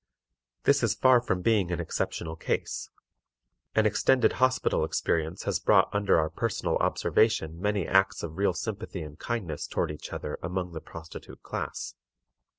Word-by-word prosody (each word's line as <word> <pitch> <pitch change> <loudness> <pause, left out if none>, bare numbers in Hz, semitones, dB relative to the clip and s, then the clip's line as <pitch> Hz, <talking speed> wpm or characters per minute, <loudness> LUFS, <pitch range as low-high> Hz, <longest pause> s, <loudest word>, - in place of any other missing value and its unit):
This - - +4
is - - +2
far 130 -2 +5
from 95 -7 -1
being 105 -6 +2
an 85 - -1
exceptional 80 -1 -3
case. - - -3 0.9
An 110 - +4
extended 125 +4 +3
hospital 130 0 +2
experience 80 +2 -1
has - - 0
brought - - +4
under 100 -3 +3
our 80 -1 +1
personal - - -1
observation 85 -7 +1
many 105 -3 0
acts 95 0 +3
of 85 +1 -6
real 100 -2 +3
sympathy 105 -5 -4
and 75 0 -10
kindness 100 -11 -3
toward - - -1
each 75 - -8
other 75 - -5
among 90 +1 -3
the 80 - -6
prostitute 80 0 -11
class. - - -4
90 Hz, 155 wpm, -28 LUFS, 80-110 Hz, 0.9 s, far